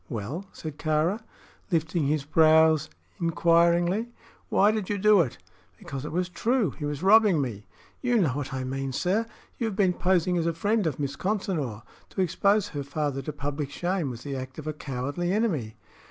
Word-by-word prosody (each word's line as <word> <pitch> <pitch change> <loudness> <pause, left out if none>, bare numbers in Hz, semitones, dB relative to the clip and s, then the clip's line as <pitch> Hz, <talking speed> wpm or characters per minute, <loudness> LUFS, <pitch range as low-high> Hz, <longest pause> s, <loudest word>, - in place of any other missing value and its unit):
"Well?" 135 - -5
said 155 -2 -8
Kāra, 160 +7 +1 0.5
lifting 160 -3 0
his 145 -1 0
brows 155 0 +5 0.3
inquiringly. 170 +5 +3 0.4
"Why 205 +2 +4
did 215 -3 -3
you 205 - 0
do 210 -1 +5
it?" 135 -8 -3 0.4
"Because 135 0 -7
it - - -5
was 180 +2 0
true. 220 - 0
He 150 - -6
was 145 +2 -4
robbing 205 -3 +6
me." 115 -7 -4 0.3
"You 245 -1 +2
know 180 -9 +3
what 135 +1 -4
I 130 -1 -3
mean, 135 +1 -3
sir! 195 - 0 0.3
You 235 - 0
have 210 - -4
been 190 -2 +3
posing 180 -1 +1
as 165 - 0
a 170 - +1
friend 205 +2 +1
of 150 -3 -3
Miss 140 -1 -2
Consinor. 170 - -2 0.3
To 190 - -2
expose 200 +3 +2
her 145 -5 -4
father 140 0 -2
to 145 - -5
public 145 0 -4
shame 175 0 -1
was 120 -1 -7
the 140 -1 -4
act 130 0 -7
of 155 - -7
a 155 - -2
cowardly 145 +5 -3
enemy." 165 - 0
160 Hz, 185 wpm, -27 LUFS, 140-190 Hz, 0.5 s, robbing